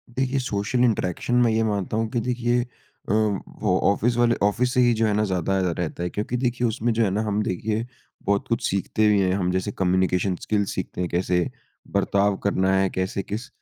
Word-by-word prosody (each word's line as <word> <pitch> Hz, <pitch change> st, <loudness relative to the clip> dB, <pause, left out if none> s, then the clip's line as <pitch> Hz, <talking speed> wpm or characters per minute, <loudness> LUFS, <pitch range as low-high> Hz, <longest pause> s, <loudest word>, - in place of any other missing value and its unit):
देखिए 130 Hz, +1 st, 0 dB
social 120 Hz, 0 st, 0 dB
interaction 110 Hz, 0 st, 0 dB
मैं 115 Hz, -, +3 dB
ये 110 Hz, 0 st, +2 dB
मानता 105 Hz, -1 st, -1 dB
हूँ 115 Hz, 0 st, 0 dB
कि 120 Hz, -, -1 dB
देखिए 120 Hz, 0 st, 0 dB
अ, 120 Hz, -4 st, -9 dB
वो 105 Hz, -2 st, 0 dB
ऑफिस 115 Hz, +4 st, +1 dB
वाले 120 Hz, 0 st, +3 dB
ऑफिस 125 Hz, +5 st, +1 dB
से 125 Hz, -, +3 dB
ही 120 Hz, -1 st, +4 dB
जो 115 Hz, 0 st, +1 dB
है 105 Hz, -, +1 dB
ना 105 Hz, +1 st, +2 dB
ज़्यादा 95 Hz, 0 st, 0 dB
अ, 90 Hz, -2 st, +1 dB
रहता 85 Hz, 0 st, -3 dB
है। 90 Hz, -, -1 dB
क्योंकि 105 Hz, +6 st, -3 dB
देखिए 125 Hz, -1 st, 0 dB
उसमें 115 Hz, +1 st, -1 dB
जो 115 Hz, +1 st, +2 dB
है 105 Hz, -, +2 dB
ना 105 Hz, +3 st, 0 dB
हम 105 Hz, -1 st, 0 dB
देखिए 110 Hz, +5 st, -2 dB, 0.4 s
बहुत 100 Hz, 0 st, +1 dB
कुछ 115 Hz, -1 st, -1 dB
सीखते 100 Hz, +3 st, +1 dB
भी 105 Hz, -1 st, +4 dB
हैं 95 Hz, -1 st, +2 dB
हम 90 Hz, -2 st, 0 dB
जैसे 95 Hz, +2 st, -1 dB
कम्यूनिकेशन 95 Hz, 0 st, +1 dB
स्किल 105 Hz, -1 st, 0 dB
सीखते 95 Hz, -1 st, -4 dB
हैं 90 Hz, -, -1 dB
कैसे 90 Hz, +2 st, 0 dB, 0.4 s
बर्ताव 100 Hz, 0 st, +2 dB
करना 95 Hz, -1 st, +2 dB
है, 95 Hz, 0 st, +2 dB
कैसे 95 Hz, +2 st, -2 dB
किस 110 Hz, +6 st, -5 dB
105 Hz, 210 wpm, -24 LUFS, 95-115 Hz, 0.4 s, ही